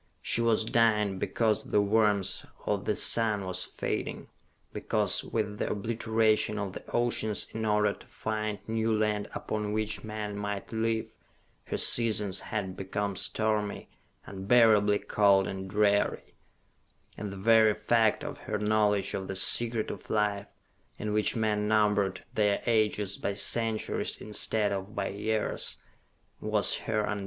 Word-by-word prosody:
She 115 - +1
was 115 -1 +2
dying 105 -4 +2
because 110 0 0
the - - +1
warmth 105 -1 +2 0.2
of - - -1
the - - 0
sun 110 -4 +2
was 90 0 -1
fading; - - -4 0.4
because, - - +1
with 105 -2 -3
the - - -1
obliteration 110 0 0
of 100 -3 -3
the - - -8
oceans 120 -3 +1
in 110 0 -3
order 105 -1 +2
to - - -17
find 110 -1 -3
new 115 0 0
land 105 -1 0
upon 105 -1 -3
which 110 0 -2
men 105 -1 -5
might 100 -1 -4
live, 110 0 -1 0.5
her - - -3
seasons 105 -5 +1
had 100 -4 -4
become 100 +1 -3
stormy, 105 +1 -1 0.4
unbearably 105 0 +4
cold 100 -2 +3
and 95 0 -6
dreary: 100 0 +1 0.8
and 105 -2 -6
the 100 - -8
very 110 +1 +5
fact 115 -2 +2
of - - -6
her - - -1
knowledge 105 -1 +1
of 95 -1 -4
the 95 - -4
Secret 115 +3 +2
of - - -10
Life, 105 -1 0 0.5
in 105 0 -3
which 105 0 +1
men 105 -2 0
numbered 105 -3 +1
their 105 -2 +2
ages 105 -3 +1
by 100 - -2
centuries 110 +2 -1
instead 105 0 -2
of 100 +1 -5
by 100 -1 -2
years, 110 +2 -2 0.6
was - - +2
her 110 -1 -1
undoing. 105 -1 -2
105 Hz, 145 wpm, -29 LUFS, 100-110 Hz, 0.8 s, very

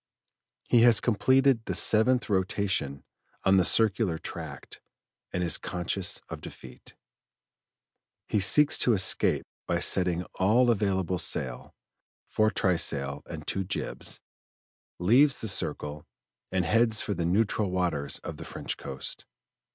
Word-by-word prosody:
He 120 - +4
has 115 -3 +6
completed 130 +2 +2
the - - -3
seventh 120 +3 +3
rotation 95 -7 -1 0.4
on 95 0 +4
the 95 - +4
circular 100 -3 +2
tract - - -9 0.5
and 90 - -2
is 85 - +2
conscious 90 -1 -3
of - - -8
defeat. - - -12 1.3
He 105 - 0
seeks 150 +10 +3
to 120 - +2
escape 95 -3 +2 0.2
by - - 0
setting 90 -1 +2
all 115 +6 +4
available 95 -4 -1
sail 65 -7 -4 0.5
(foretrysail 80 -9 0
and - - -8
two 95 - -2
jibs), 95 - -5 0.8
leaves 125 +10 +3
the 110 - -2
circle 75 -6 -2 0.4
and 95 -2 0
heads 110 +3 +2
for 105 - -2
the 85 -3 -2
neutral 105 +2 +1
waters 90 -6 -1
of - - -7
the - - -8
French - - -5
coast. 65 -1 -7
95 Hz, 125 wpm, -27 LUFS, 90-115 Hz, 1.3 s, has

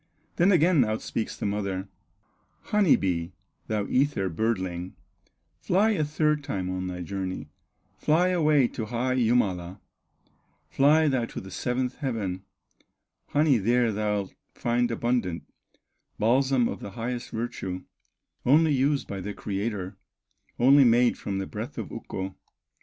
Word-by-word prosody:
Then 180 +4 +5
again 170 -4 +5
out 110 -1 -2
speaks 110 - -3
the - - -4
mother: 100 -2 -2 0.7
"Honey 210 -6 +4
bee, 85 -2 -2 0.3
thou 105 -2 -1
ether 130 -8 +1
birdling, 95 -2 -2 0.6
Fly 205 +5 +2
a 190 -8 +1
third 150 0 +1
time 95 -10 -3
on 95 0 -3
thy 90 -1 -5
journey, 95 +1 -4 0.5
Fly 170 +4 +3
away 155 -7 +3
to 110 - -5
high 125 +3 -1
Jumala, 100 -7 +1 0.9
Fly 155 +3 +4
thou 130 -4 +1
to - - -7
the 95 - -10
seventh 125 +5 -2
heaven, 105 -10 -3 0.8
Honey 145 -4 +3
there 120 +3 +2
thou'lt 105 -2 -2 0.2
find 120 0 +1
abundant, 115 -8 -1 0.7
Balsam 130 +2 +3
of - - -5
the 100 - -8
highest 120 +1 -3
virtue, 95 -5 -4 0.6
Only 155 +4 +5
used 140 +1 +1
by 100 -1 -5
the 105 +2 -5
Creator, 100 -2 -4 0.6
Only 135 +3 +6
made 120 0 +4
from 100 -1 -4
the 95 - -2
breath - - -7
of - - -5
Ukko. 95 0 -5
115 Hz, 135 wpm, -27 LUFS, 95-140 Hz, 0.9 s, Only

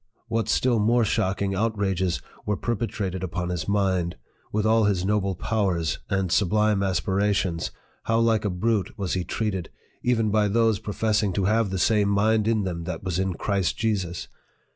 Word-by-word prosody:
what 115 -2 -1
still 120 0 +2
more 115 +2 +3
shocking 95 0 0
outrages 95 -4 0 0.2
were 105 -1 -1
perpetrated 100 -5 -2
upon 90 0 -3
his 90 -3 -3
mind! 95 -4 +1 0.4
with 105 0 0
all 110 0 +4
his 95 -3 +1
noble 100 -2 +1
powers 90 -4 0
and 95 -3 0
sublime 105 +1 +2
aspirations, 95 -1 0 0.4
how 115 - +2
like 115 -2 +3
a 105 - 0
brute 105 +3 -1
was 95 -4 -2
he 90 - 0
treated, 95 -1 -2 0.3
even 115 -3 +1
by 105 0 +3
those 110 -1 +2
professing 105 -1 0
to 95 +1 0
have 110 +1 +2
the 95 - -2
same 105 +2 +3
mind 105 +2 +2
in 110 -2 +2
them 85 -3 -4
that 90 -1 -5
was 95 -2 -1
in 95 -2 -1
Christ 95 -1 -1
Jesus 95 -6 -1
100 Hz, 165 wpm, -25 LUFS, 95-110 Hz, 0.4 s, all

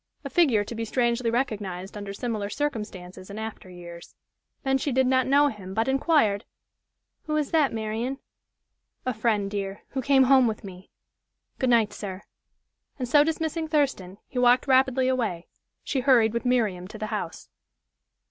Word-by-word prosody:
A - - -5
figure 270 - +3
to 210 - -7
be 230 0 -3
strangely 235 +1 0
recognized 205 -7 -3
under 200 -1 -6
similar 210 -1 -3
circumstances 205 -9 -5
in 200 - -7
after 220 -3 -7
years. 170 -1 -11 0.5
Then 270 0 +1
she 285 - -1
did 260 +1 +3
not 260 0 +2
know 285 +2 +5
him, 190 -5 -8
but 225 +2 +1
inquired: 265 -7 +2 0.8
"Who 305 - -1
is 295 -2 -1
that, 310 -4 +3
Marian?" 225 +4 -3 0.9
"A 255 - 0
friend, 215 -2 0
dear, 200 -1 -4
who 265 - -3
came 270 +1 +4
home 260 -1 +5
with 220 -1 -3
me. 190 -1 -11 0.7
Good 260 - +1
night, 225 -4 +3
sir." 195 -2 -7 0.7
And 255 -3 -3
so 290 +4 +6
dismissing 320 +1 -2
Thurston, 270 - 0
he 250 - -4
walked 245 0 +4
rapidly 260 -1 +3
away. 225 -10 -1 0.4
She 270 - -1
hurried 245 -4 +4
with 235 +2 -2
Miriam 215 -8 +1
to 215 - -10
the 215 - -4
house. - - -5
235 Hz, 165 wpm, -26 LUFS, 205-265 Hz, 0.9 s, so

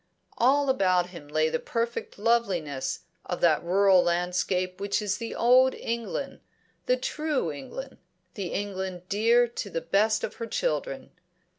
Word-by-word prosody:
All 275 +4 +4
about 185 -6 +2
him 165 -5 -10
lay 155 +1 +1
the - - -1
perfect 230 0 -3
loveliness 185 - 0 0.2
of 180 - -4
that 165 -2 +4
rural 190 +1 +5
landscape 180 +1 -1
which 200 0 0
is 205 -2 -1
the 230 -1 -5
old 255 +2 +5
England, 235 +4 -4 0.5
the 250 - +3
true 290 - -1
England, 260 - -8 0.3
the 195 -3 -4
England 190 -2 -4
dear 230 +4 +4
to 230 -3 -6
the 165 - -2
best 205 +6 +1
of - - -4
her 230 - -4
children. - - -2
200 Hz, 145 wpm, -27 LUFS, 180-235 Hz, 0.5 s, rural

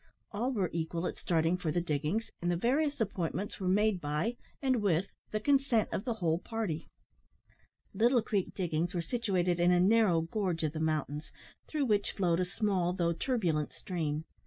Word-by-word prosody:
All 235 +5 -1
were 195 -8 0
equal 165 +1 -2
at - - -2
starting 165 +1 +1
for 170 -4 -2
the 175 - +1
diggings, 160 +6 -1
and 175 - 0
the 175 - +2
various 285 - +1
appointments 195 -1 -2
were 190 - -2
made 200 0 +3
by, 150 +11 -1 0.2
and 260 -2 +2
with 185 -3 +2 0.2
the 215 - -1
consent 270 -4 +2
of 200 - -2
the 240 -3 -1
whole 170 -5 +1
party. 205 -8 -3 1.1
Little 240 +1 +3
Creek 200 -4 -1
diggings 175 0 -1
were 175 - +1
situated 185 -5 0
in 175 +1 +4
a 180 - +4
narrow 195 -3 +4
gorge 170 -1 -2
of 155 -1 0
the 155 - -4
mountains, 155 -1 -2 0.4
through 300 -3 0
which 210 -4 +1
flowed 175 -3 +1
a 185 - +2
small 185 -2 0
though 170 -2 +1
turbulent 170 - 0
stream. 160 -5 -3
180 Hz, 180 wpm, -32 LUFS, 165-220 Hz, 1.1 s, in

